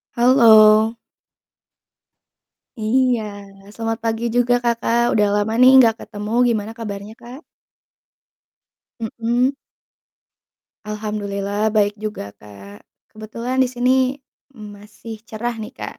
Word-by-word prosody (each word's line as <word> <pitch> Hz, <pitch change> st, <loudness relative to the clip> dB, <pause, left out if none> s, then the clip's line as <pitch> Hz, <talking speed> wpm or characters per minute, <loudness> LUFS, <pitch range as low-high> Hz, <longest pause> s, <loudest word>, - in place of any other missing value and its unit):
Halo. 225 Hz, -3 st, +5 dB, 1.8 s
Iya, 245 Hz, +2 st, +1 dB, 0.5 s
selamat 225 Hz, 0 st, -3 dB
pagi 225 Hz, +1 st, -2 dB
juga, 245 Hz, 0 st, +2 dB
Kakak, 235 Hz, 0 st, 0 dB
udah 210 Hz, -1 st, +2 dB
lama 220 Hz, +2 st, -3 dB
nih 255 Hz, -, +8 dB
nggak 225 Hz, -3 st, +3 dB
ketemu. 210 Hz, +1 st, -8 dB, 0.2 s
Gimana 220 Hz, -2 st, -2 dB
kabarnya, 205 Hz, -2 st, -7 dB
Kak? 245 Hz, +3 st, -11 dB, 1.6 s
Mhm. 235 Hz, +4 st, -1 dB, 1.3 s
Alhamdullillah, 210 Hz, 0 st, -3 dB
baik 205 Hz, -1 st, +1 dB
juga 210 Hz, -, -6 dB
Kak. 100 Hz, -1 st, -15 dB, 0.2 s
Kebetulan 230 Hz, +4 st, -6 dB
di -, -, 0 dB
sini 250 Hz, 0 st, 0 dB, 0.6 s
masih 210 Hz, 0 st, -11 dB
cerah 235 Hz, +2 st, -5 dB
nih 220 Hz, +3 st, -8 dB
Kak. -, -, -8 dB
220 Hz, 100 wpm, -19 LUFS, 210-235 Hz, 1.8 s, nih